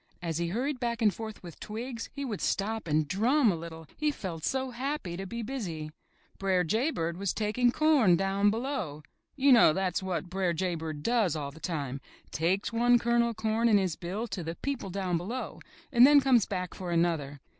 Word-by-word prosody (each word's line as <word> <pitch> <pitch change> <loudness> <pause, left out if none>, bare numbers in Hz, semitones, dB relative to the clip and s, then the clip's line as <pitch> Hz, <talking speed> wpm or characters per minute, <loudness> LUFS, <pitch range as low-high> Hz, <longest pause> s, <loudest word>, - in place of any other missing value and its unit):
As 165 -2 -3
he 170 - 0
hurried 250 - -2
back 235 -2 -2
and 210 -3 +4
forth 220 -3 -8
with 170 -3 -10
twigs, 230 +2 -6
he 280 0 -5
would 215 -7 -4
stop 220 0 -1
and 155 -1 +1
drum 230 - +3
a - - -1
little, 165 0 -8
he 305 0 0
felt 175 - -5
so 265 +3 -1
happy 255 - -3
to 190 +2 -5
be 235 +3 -5
busy. 180 - -5 0.5
Br'er 190 -2 +2
Jay 220 - +1
Bird 170 - -3
was 195 -1 -1
taking 225 +3 +1
corn 280 - +4
Down 195 +2 +2
Below. 220 - -3 0.3
You 280 0 +4
know 230 -10 +7
that 185 -1 -1
is - - -1
what 185 -1 -3
Br'er 185 -1 0
Jay 180 +2 -1
Bird 155 -3 -5
does 220 -7 +2
all 145 -2 -4
the 155 - -14
time: 140 -6 -4 0.3
takes 185 +7 0
one 240 +1 +4
kernel 235 0 +2
of 230 - -5
corn 225 +2 +1
in 210 - +6
his 185 -5 0
bill 190 +6 -4
to 190 -2 -4
the 165 +1 -4
people 275 -5 -4
Down 185 -2 -1
Below 230 +9 -5 0.3
and 245 -1 +8
then 290 0 +7
comes 260 -6 +3
back 180 -2 -3
for 185 -2 -6
another. 165 -5 0
195 Hz, 210 wpm, -29 LUFS, 170-235 Hz, 0.5 s, and